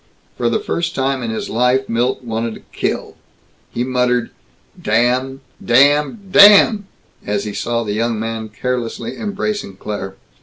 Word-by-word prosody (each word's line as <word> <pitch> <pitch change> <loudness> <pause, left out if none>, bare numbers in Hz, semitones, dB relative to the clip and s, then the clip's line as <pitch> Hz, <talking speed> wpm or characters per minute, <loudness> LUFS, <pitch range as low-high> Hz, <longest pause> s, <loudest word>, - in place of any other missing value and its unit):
For - - 0
the - - +1
first 170 - -3
time 135 0 0
in 115 - -3
his 110 - -4
life 125 +3 +1
Milt 120 +3 -1
wanted 115 -1 -3
to - - -14
kill. - - -3 0.5
He 120 - -2
muttered, 125 -1 0 0.5
"Damn 125 +4 +1 0.2
damn 145 - +3
DAMN!" 205 +1 +7 0.4
as 100 0 -2
he 105 - -5
saw 115 +4 -2
the 105 -2 -3
young 115 +1 -1
man 110 0 -4
carelessly 120 +1 -4
embracing 205 - -4
Claire. 95 -1 -6
125 Hz, 145 wpm, -18 LUFS, 115-140 Hz, 0.5 s, DAMN